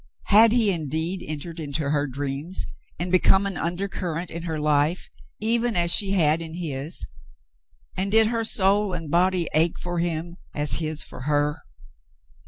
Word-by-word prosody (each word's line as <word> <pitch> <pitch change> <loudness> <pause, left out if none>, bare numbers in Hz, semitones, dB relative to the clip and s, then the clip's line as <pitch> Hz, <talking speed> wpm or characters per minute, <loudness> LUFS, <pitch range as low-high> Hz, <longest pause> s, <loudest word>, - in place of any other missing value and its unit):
Had 220 +2 +7
he 225 -4 +3
indeed 160 +2 -2
entered 160 +2 -6
into 145 -1 -3
her 145 -1 +1
dreams 140 +6 -4 0.3
and 175 +1 -3
become 190 +2 +4
an 195 -2 -3
undercurrent 175 -1 -3
in 170 - -5
her 160 -1 -2
life 150 +3 +1 0.3
even 230 +1 +1
as 170 -1 +3
she 200 -2 +3
had 160 -3 +2
in 165 0 -7
his, 155 -3 -2 0.9
and 195 +1 -2
did 220 +1 +5
her 230 +1 -1
soul 200 -2 +3
and 165 -4 -5
body 180 0 +2
ache 160 +2 +3
for 175 -1 -4
him 170 0 -3 0.2
as 145 -3 +2
his 155 -1 -1
for 130 - -9
her 145 0 +1
170 Hz, 160 wpm, -24 LUFS, 150-190 Hz, 0.9 s, Had